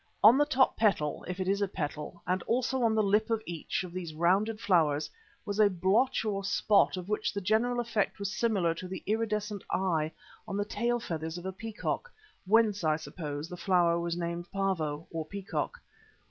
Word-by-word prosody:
On 220 Hz, +4 st, +9 dB
the 290 Hz, +1 st, +3 dB
top 265 Hz, -3 st, +3 dB
petal 175 Hz, -9 st, +1 dB
(if 180 Hz, +1 st, -4 dB
it 185 Hz, -, -1 dB
is 200 Hz, +1 st, +1 dB
a 200 Hz, -, +2 dB
petal), 150 Hz, -1 st, -5 dB
and 185 Hz, +1 st, 0 dB
also 255 Hz, +2 st, +1 dB
on 225 Hz, -2 st, +3 dB
the 215 Hz, -, +3 dB
lip 210 Hz, +2 st, +2 dB
of 225 Hz, -1 st, +1 dB
each 170 Hz, +2 st, -3 dB
of 180 Hz, -1 st, -8 dB
these 170 Hz, -4 st, -5 dB
rounded 195 Hz, +7 st, +2 dB
flowers 160 Hz, -8 st, +2 dB, 0.3 s
was 205 Hz, +1 st, -3 dB
a 210 Hz, -1 st, +6 dB
blotch 195 Hz, +8 st, +2 dB
or 200 Hz, -2 st, -1 dB
spot 200 Hz, 0 st, +3 dB
of 180 Hz, 0 st, -6 dB
which 210 Hz, 0 st, 0 dB
the 205 Hz, -, -3 dB
general 225 Hz, +5 st, +1 dB
effect 225 Hz, -4 st, 0 dB
was 200 Hz, 0 st, -3 dB
similar 195 Hz, -8 st, +1 dB
to 185 Hz, +2 st, -7 dB
the 185 Hz, 0 st, -6 dB
iridescent 210 Hz, -1 st, -1 dB
eye 160 Hz, -5 st, 0 dB, 0.4 s
on 200 Hz, -, -3 dB
the 205 Hz, -, 0 dB
tail 240 Hz, +3 st, 0 dB
feathers 160 Hz, -5 st, -4 dB
of 175 Hz, -, -8 dB
a 190 Hz, -, -2 dB
peacock, 225 Hz, -, -4 dB, 0.4 s
whence, 215 Hz, -2 st, +3 dB
I 155 Hz, -1 st, +3 dB
suppose, 155 Hz, -2 st, -5 dB
the 180 Hz, -, -8 dB
flower 175 Hz, -2 st, +3 dB
was 170 Hz, 0 st, -2 dB
named 170 Hz, 0 st, -4 dB
"Pavo," 165 Hz, -6 st, -1 dB
or 165 Hz, -1 st, -3 dB
Peacock. 200 Hz, -, -4 dB
195 Hz, 195 wpm, -30 LUFS, 170-215 Hz, 0.4 s, On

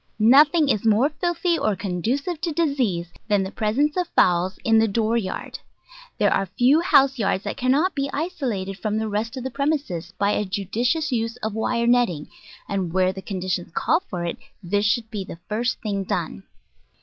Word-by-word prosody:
Nothing 290 Hz, +8 st, +5 dB
is 215 Hz, -7 st, +1 dB
more 225 Hz, +5 st, +3 dB
filthy 340 Hz, +2 st, -1 dB
or 215 Hz, -2 st, +1 dB
conducive 240 Hz, -, -2 dB
to 335 Hz, 0 st, -1 dB
disease 250 Hz, -, -1 dB
than 205 Hz, -3 st, +2 dB
the 190 Hz, -, -5 dB
presence 260 Hz, +10 st, 0 dB
of 360 Hz, -2 st, 0 dB
fowls 180 Hz, +2 st, +3 dB
in 225 Hz, -1 st, +4 dB
the 225 Hz, -, +3 dB
door 220 Hz, +2 st, 0 dB
yard. 210 Hz, -5 st, -3 dB, 0.6 s
There -, -, +3 dB
are 195 Hz, -, 0 dB
few 265 Hz, +6 st, +5 dB
house 275 Hz, -6 st, +4 dB
yards 195 Hz, -2 st, 0 dB
that -, -, -4 dB
cannot 285 Hz, +9 st, +2 dB
be 275 Hz, -1 st, -2 dB
isolated 245 Hz, -, -3 dB
from 215 Hz, -1 st, -1 dB
the 220 Hz, 0 st, -1 dB
rest 220 Hz, +4 st, -3 dB
of 255 Hz, -, -5 dB
the 260 Hz, -, -4 dB
premises 280 Hz, -, -2 dB
by 200 Hz, 0 st, +2 dB
a 210 Hz, -, 0 dB
judicious 230 Hz, -, -1 dB
use 230 Hz, -1 st, -1 dB
of 220 Hz, -1 st, -2 dB
wire 235 Hz, +2 st, 0 dB
netting, 235 Hz, -11 st, +2 dB, 0.4 s
and 190 Hz, -4 st, -2 dB
where 185 Hz, +1 st, +2 dB
the 190 Hz, -, -8 dB
conditions 185 Hz, -3 st, -3 dB
call 320 Hz, -, +2 dB
for 175 Hz, -2 st, -3 dB
it 170 Hz, -, -3 dB, 0.3 s
this 205 Hz, +4 st, 0 dB
should 225 Hz, +1 st, 0 dB
be 205 Hz, -3 st, -3 dB
the 185 Hz, -, -9 dB
first 235 Hz, +3 st, -1 dB
thing 200 Hz, -3 st, -2 dB
done. 180 Hz, +1 st, -3 dB
225 Hz, 185 wpm, -23 LUFS, 195-275 Hz, 0.6 s, Nothing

